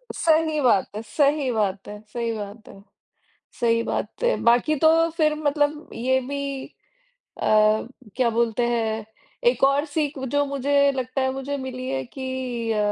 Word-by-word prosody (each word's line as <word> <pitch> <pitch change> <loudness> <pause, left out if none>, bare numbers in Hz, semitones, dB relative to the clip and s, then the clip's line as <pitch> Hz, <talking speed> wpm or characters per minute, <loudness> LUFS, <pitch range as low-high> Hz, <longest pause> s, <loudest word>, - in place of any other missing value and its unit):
सही 315 -2 +2
बात 230 -8 +3
है 215 - -3
सही 280 +3 +1
बात 200 -3 -1
है 210 0 -8
सही 235 -1 -2
बात 205 +2 -8
है 195 - -14 0.8
सही 230 -1 +2
बात - - -4
है। 485 - +3
बाकी 240 +6 +4
तो 315 - +6 0.3
फिर 305 -1 +3
मतलब 295 0 0
ये 260 +3 +1
भी 275 0 -4 0.8
अ, - - 0 0.7
क्या 255 -2 +3
बोलते 235 +1 +1
हैं? 220 -2 -1 0.4
एक 485 - +3
और 275 +2 +3
सीख 295 -2 -2
जो 285 +2 +1
मुझे 280 0 +2
लगता 260 0 -3
है 260 0 +1
मुझे 270 +2 -4
मिली 255 -1 -5
है 130 0 -2
कि 255 - -4
अ 215 - -1
260 Hz, 160 wpm, -24 LUFS, 230-285 Hz, 0.8 s, तो